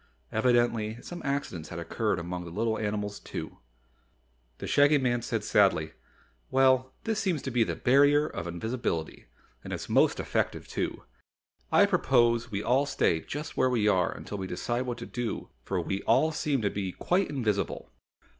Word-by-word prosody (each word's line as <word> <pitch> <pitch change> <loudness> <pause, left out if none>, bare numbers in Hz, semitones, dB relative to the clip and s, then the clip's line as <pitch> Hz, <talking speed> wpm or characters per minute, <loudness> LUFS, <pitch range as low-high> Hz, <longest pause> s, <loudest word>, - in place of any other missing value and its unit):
Evidently 115 -1 +1
some 175 0 -7
accidents 140 - -3
had 85 - -7
occurred 95 +6 -1
among 90 +1 -4
the 85 - -8
little 110 +6 -1
animals, 105 -1 -2
too. - - -7 1.0
The - - -6
Shaggy 145 +1 +5
Man 120 -3 +1
said - - -2
sadly, - - +3 0.6
"Well, 130 -1 +3
this 220 -2 -1
seems 185 -8 -1
to 130 - -3
be 120 -1 +3
the - - -3
Barrier 145 +3 +4
of 85 - -5
Invisibility, 85 -3 -3 0.4
and - - -8
it's - - -4
most - - +3
effective - - -1
too. - - -3 0.7
I - - +6
propose 120 -3 +2
we 100 0 -3
all 135 +3 +2
stay 80 - +2
just 150 - -6
where 130 - +3
we 115 -4 +1
are 95 -3 +3
until 105 - -7
we 95 - -4
decide 120 +8 -2
what 120 -1 -3
to - - -7
do 120 -2 -4
for - - -2
we 95 0 -2
all 160 - +3
seem 145 -5 -1
to 100 - +1
be 95 -3 -3
quite 190 +2 0
invisible." 105 - -2
120 Hz, 170 wpm, -28 LUFS, 100-135 Hz, 1.0 s, I